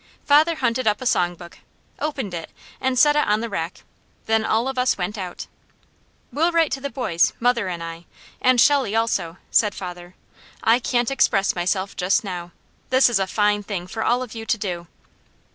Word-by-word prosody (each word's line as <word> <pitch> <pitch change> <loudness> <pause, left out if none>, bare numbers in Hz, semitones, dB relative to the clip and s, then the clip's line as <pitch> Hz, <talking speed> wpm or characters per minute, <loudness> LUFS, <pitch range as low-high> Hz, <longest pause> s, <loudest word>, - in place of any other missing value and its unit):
Father 310 +3 +5
hunted 255 -4 -1
up 210 -1 +2
a 255 - -7
song 175 -7 +1
book, 170 0 -13 0.4
opened 265 - -3
it 165 -1 -5 0.3
and 260 -1 0
set 295 +4 +5
it 300 - +2
on 210 +1 +2
the 230 +1 -4
rack. 165 -2 -4 0.4
Then 220 0 +2
all 225 +3 +1
of 265 -1 -2
us 250 0 +2
went 185 +3 -3
out. 185 -4 -6 0.9
"We'll 330 +4 +2
write 330 -2 +2
to 270 - -3
the 280 - -3
boys, 185 -10 +1
mother 235 -4 +1
and 170 -2 -4
I, 165 +1 -8 0.4
and 255 -1 +4
Shelley 265 -4 +4
also," 220 -7 0
said 210 -3 +3
father. 180 -1 -8 0.5
"I 230 +2 +4
can't 245 0 0
express 210 -7 +2
myself 185 +2 -1
just 185 +4 +1
now. 175 -3 -5 0.4
This 260 -1 +4
is 220 - +2
a 190 - 0
fine 205 +1 +1
thing 195 -4 -5
for 220 +4 -4
all 245 +1 +1
of 245 - -9
you 225 -1 -6
to 225 - 0
do." 175 -5 -4
220 Hz, 195 wpm, -22 LUFS, 180-255 Hz, 0.9 s, Father